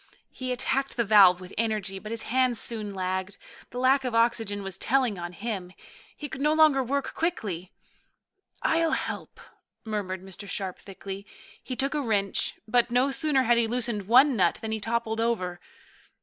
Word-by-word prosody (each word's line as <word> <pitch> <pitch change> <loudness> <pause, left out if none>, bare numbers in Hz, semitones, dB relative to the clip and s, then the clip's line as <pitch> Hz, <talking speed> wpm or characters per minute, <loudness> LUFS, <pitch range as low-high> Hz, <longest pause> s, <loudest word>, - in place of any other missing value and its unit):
He 255 -1 -5
attacked 265 +2 -1
the 235 - +3
valve 195 -4 +7
with 185 0 -11
energy, 210 -4 -1
but 215 - -9
his 230 -1 -1
hands 250 -1 +1
soon 215 -3 -3
lagged. 185 +1 -3 0.3
The 245 - -9
lack 265 +2 +3
of 250 -3 -2
oxygen 225 -3 +1
was 195 -1 -5
telling 250 -6 +1
on 175 0 -5
him. 190 -2 -5 0.4
He 295 - -5
could 270 -1 -7
no 300 +1 +3
longer 310 -4 +5
work 275 +2 -2
quickly. 200 - -3 0.9
"I'll 325 -1 +2
help," - - -4 0.5
murmured 195 -4 -3
Mr. 195 +1 -9
Sharp 190 -3 -3
thickly. 195 0 -8 0.3
He 255 - -5
took 275 +3 0
a 300 - 0
wrench, 205 -6 0
but 240 +1 +3
no 250 +3 +2
sooner 270 0 +2
had 235 0 +4
he 230 - +2
loosened 230 -4 -2
one 260 +4 +6
nut 190 - +2
than 220 - -3
he 220 - -1
toppled 225 0 -1
over. 185 -7 -1
225 Hz, 175 wpm, -27 LUFS, 195-255 Hz, 0.9 s, valve